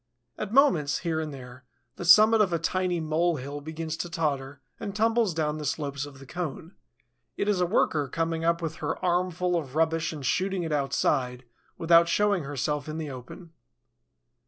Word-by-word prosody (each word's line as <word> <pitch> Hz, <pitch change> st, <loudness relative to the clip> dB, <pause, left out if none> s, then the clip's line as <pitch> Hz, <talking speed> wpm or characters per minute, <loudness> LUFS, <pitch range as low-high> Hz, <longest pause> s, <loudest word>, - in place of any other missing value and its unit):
At 210 Hz, -, -5 dB
moments, 190 Hz, -, +4 dB
here 160 Hz, -2 st, 0 dB
and 155 Hz, -1 st, -4 dB
there, 130 Hz, -1 st, -11 dB, 0.3 s
the 175 Hz, -, -6 dB
summit 215 Hz, +5 st, +7 dB
of 195 Hz, -4 st, +2 dB
a 170 Hz, -, +1 dB
tiny 180 Hz, +2 st, -1 dB
mole 160 Hz, +2 st, +1 dB
hill 145 Hz, +1 st, -6 dB
begins 160 Hz, +1 st, -5 dB
to 175 Hz, -, -4 dB
totter 145 Hz, -5 st, -2 dB, 0.2 s
and 200 Hz, -, -5 dB
tumbles 225 Hz, -1 st, +2 dB
down 155 Hz, -1 st, -1 dB
the -, -, -5 dB
slopes 145 Hz, -1 st, -3 dB
of 140 Hz, -2 st, -13 dB
the 135 Hz, -, -12 dB
cone: 165 Hz, +2 st, -6 dB, 0.6 s
it 200 Hz, -, -1 dB
is 200 Hz, -3 st, +2 dB
a 180 Hz, -, +2 dB
worker 155 Hz, -7 st, +1 dB
coming 165 Hz, +3 st, -2 dB
up 170 Hz, 0 st, +1 dB
with 160 Hz, -1 st, -4 dB
her 155 Hz, +1 st, -3 dB
armful 180 Hz, 0 st, +1 dB
of 145 Hz, -5 st, -3 dB
rubbish 165 Hz, 0 st, +1 dB
and 150 Hz, -4 st, -7 dB
shooting 190 Hz, +6 st, 0 dB
it 160 Hz, -, -4 dB
outside, 135 Hz, -3 st, 0 dB, 0.3 s
without 170 Hz, 0 st, +5 dB
showing 200 Hz, -4 st, +2 dB
herself 145 Hz, +1 st, -2 dB
in 155 Hz, -, -4 dB
the 155 Hz, -3 st, -4 dB
open. 130 Hz, +7 st, -10 dB
160 Hz, 180 wpm, -27 LUFS, 145-180 Hz, 0.6 s, summit